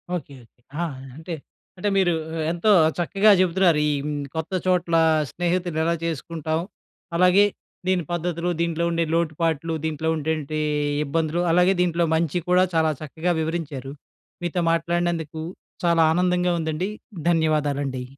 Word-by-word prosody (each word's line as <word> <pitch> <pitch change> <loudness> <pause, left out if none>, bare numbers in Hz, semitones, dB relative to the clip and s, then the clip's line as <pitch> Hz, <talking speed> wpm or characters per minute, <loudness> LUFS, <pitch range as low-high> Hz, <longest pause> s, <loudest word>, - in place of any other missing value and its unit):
Okay! 140 -5 -6
Okay! 120 +1 -28 0.2
ఆ! - - +1 0.3
అంటే 160 +3 -7 0.4
అంటే 205 +3 0
మీరు 180 -3 +3 0.2
ఎ - - -3
ఎంతో 175 +5 +2 0.3
చక్కగా 195 +5 +4
చెబుతున్నారు. 180 -3 +3
ఈ - - +2
హ్మ్, 145 -1 -3
కొత్త 160 +3 -3
చోట్ల 180 -2 +1 0.4
స్నేహితులు 175 -1 -1
ఎలా 170 +1 +2
చేసుకుంటాం, 160 0 -2 0.6
అలాగే 180 +3 +5 0.4
దీని 185 -2 +2
పద్ధతులు, 175 0 -2
దీంట్లో 170 0 0
ఉండే 165 0 +1
లోటుపాట్లు, 165 -1 0
దీంట్లో 160 +1 -1
ఉండేటటువంటి 155 -1 -2 0.5
ఇబ్బందులు, 160 +3 0
అలాగే 180 +3 +4
దీంట్లో 170 -1 +2
మంచి 165 +1 0
కూడా, 180 +1 +5
చాలా 160 -1 +3
చక్కగా 160 +4 -2
వివరించారు. 150 -5 -4 0.5
మీతో 175 +1 -1
మాట్లాడినందుకు 165 -2 -1 0.4
చాలా 170 -1 +4
ఆనందంగా 180 0 +2
ఉందండి, 160 +4 -2 0.4
ధన్యవాదాలండి. 145 -5 0
165 Hz, 130 wpm, -23 LUFS, 155-175 Hz, 0.6 s, అలాగే